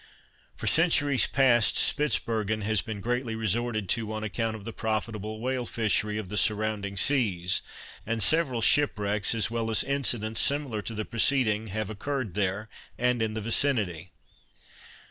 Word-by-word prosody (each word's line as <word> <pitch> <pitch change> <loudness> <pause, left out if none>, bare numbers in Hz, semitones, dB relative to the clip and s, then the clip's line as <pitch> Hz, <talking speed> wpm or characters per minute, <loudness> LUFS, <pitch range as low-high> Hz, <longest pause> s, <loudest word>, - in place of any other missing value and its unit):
For - - -7
centuries 145 -5 +3
past 125 -5 +3
Spitzbergen 110 -6 0
has 110 -1 +2
been 110 -3 -6
greatly 120 +1 -2
resorted 110 -1 -1
to 110 -2 0
on 110 0 -4
account 110 +1 -2
of 105 -2 -10
the 115 - -5
profitable 110 -1 -3
whale 125 0 -2
fishery 105 -1 0
of 110 -3 -4
the 105 +3 -4
surrounding 105 -1 0
seas, 95 -9 +1 0.4
and 115 -1 -2
several 130 - +1
shipwrecks, 105 -7 +2
as 110 0 +1
well 115 -1 -2
as 110 - +3
incidents 120 -6 0
similar 140 -7 0
to 115 - -4
the 110 0 -3
preceding, 115 -3 +2
have 110 +1 -3
occurred 125 -1 -4
there, 100 +2 -1 0.3
and 125 -1 +1
in 110 -1 -1
the 110 - -3
vicinity. 105 - 0
110 Hz, 150 wpm, -27 LUFS, 105-120 Hz, 0.4 s, centuries